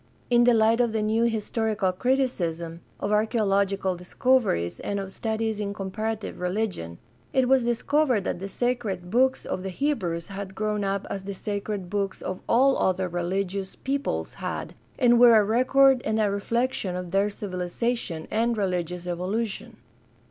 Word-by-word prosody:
In 240 0 +5
the 245 - +6
light 225 +2 +4
of 235 -2 +1
the 220 -1 0
new 220 +2 +2
historical 220 -3 0
criti 255 +8 +2
cism, 170 -8 -3 0.2
of 205 - -2
archaeological 200 -3 +1
discoveries, 180 - +1
and 200 0 -2
of 195 -1 -5
studies 220 0 -2
in 200 -1 -3
com 195 -1 -5
parative 220 +1 -3
religion, 180 - -2 0.4
it 260 -1 +3
was 265 -1 +4
discovered 245 0 +1
that 175 - -2
the 195 - -5
sacred 200 -6 -2
books 260 +3 +2
of 185 - -3
the 190 - -4
Hebrews 180 - -2
had 195 -1 -6
grown 210 0 -1
up 195 0 -1
as 195 -1 -4
the 200 0 -5
sacred 200 -1 -4
books 200 -2 -1
of 185 0 -4
all 265 +3 +4
other 185 0 +1
reHgious 190 +2 -2
peoples 275 +1 -2
had, - - -4 0.2
and 240 -2 +5
were 240 -2 +8
a - - +4
record 255 +4 +4
and 220 0 0
a 210 -2 +2
reflection 205 -1 -1
of 180 -1 -5
their 195 +2 +2
civilization 185 -2 -3
and 230 +1 +1
religious 180 -3 -2
evolution. 195 +5 -3
205 Hz, 165 wpm, -26 LUFS, 185-235 Hz, 0.4 s, were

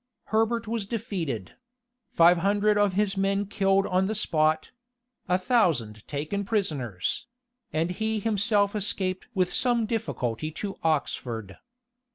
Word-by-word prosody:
Herbert 225 +1 +1
was 220 -3 -2
defeated; 185 - -4 0.5
five 170 +1 +5
hundred 205 +3 +2
of 205 -2 +2
his 200 0 +1
men 195 +1 +1
killed 195 -1 +2
on 185 +1 +1
the 220 - -2
spot; 155 -6 +1 0.6
a 180 - +4
thousand 165 - +1
taken 155 +8 -3
prisoners; 145 - -2 0.4
and 165 +3 0
he 220 +3 -1
himself 205 -1 +1
escaped 190 -2 0
with 185 -2 +1
some 240 -3 +2
difficulty 155 - -2
to 195 +4 -5
Oxford. 120 -9 -2
195 Hz, 125 wpm, -27 LUFS, 155-210 Hz, 0.6 s, five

